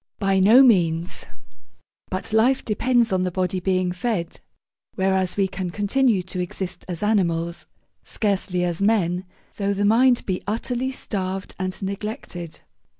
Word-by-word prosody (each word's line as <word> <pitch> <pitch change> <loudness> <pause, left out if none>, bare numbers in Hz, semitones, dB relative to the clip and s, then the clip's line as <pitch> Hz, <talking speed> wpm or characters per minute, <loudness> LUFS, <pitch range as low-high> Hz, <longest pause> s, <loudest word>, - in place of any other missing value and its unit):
By 195 -1 +1
no 220 +8 +7
means: 175 -7 +2 0.8
but 185 +3 -3
life 245 +4 +3
depends 235 0 +2
on 185 - +2
the 185 - 0
body 185 0 -1
being 185 0 0
fed, 180 -2 -3 0.6
whereas 190 -1 0
we 195 -1 +3
can 190 -1 -4
continue 205 +2 +1
to 185 0 -6
exist 180 +1 -4
as 180 +1 -4
animals 170 -5 0 0.4
(scarcely 195 -4 -1
as 175 0 -2
men) 190 -4 +1 0.3
though 200 0 0
the 205 +1 0
mind 245 +4 +4
be 185 -2 -2
utterly 245 +4 -1
starved 195 -6 -4
and 185 0 -3
neglected. 195 - -6
190 Hz, 140 wpm, -23 LUFS, 180-215 Hz, 0.8 s, no